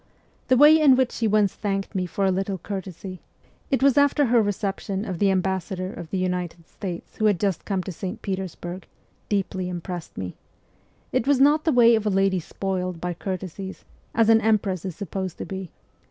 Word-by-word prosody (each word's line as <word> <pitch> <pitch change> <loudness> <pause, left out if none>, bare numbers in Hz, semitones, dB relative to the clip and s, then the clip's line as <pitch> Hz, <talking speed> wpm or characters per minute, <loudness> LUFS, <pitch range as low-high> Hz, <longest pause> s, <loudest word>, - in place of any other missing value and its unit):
The 255 - +4
way 300 +4 +8
in 275 -4 +7
which 260 -1 +2
she 230 - -1
once 210 -2 +3
thanked 195 -1 -3
me 185 -2 -1
for 195 +3 -1
a 190 - +3
little 195 +1 -1
courtesy 190 -1 -6 0.5
(it 270 -3 +1
was 280 0 +5
after 285 0 +4
her 240 -1 +4
reception 200 0 -2
of 185 -5 -4
the 200 - +4
ambassador 190 0 -1
of 170 -2 -8
the 190 - -2
United 180 -2 -3
States, 180 -4 -7
who 215 - +1
had 205 -5 +3
just 195 -5 -1
come 195 -3 -1
to 190 - -5
St. 185 +2 -5
Petersburg) 185 -1 -5 0.4
deeply 190 -2 -1
impressed 175 -1 -6
me: 90 -1 -4 0.8
it 235 - 0
was 280 -2 +4
not 295 +3 +4
the 320 - +4
way 240 -3 +6
of 220 -1 +1
a - - +3
lady 195 -1 +2
spoiled 185 0 -3
by 180 +1 -2
courtesies, 190 +1 -6 0.3
as 225 -1 +4
an 225 0 +6
empress 200 -5 +1
is 185 -4 -4
supposed 190 -2 -4
to - - -5
be. 190 -2 -6
195 Hz, 195 wpm, -24 LUFS, 185-215 Hz, 0.8 s, way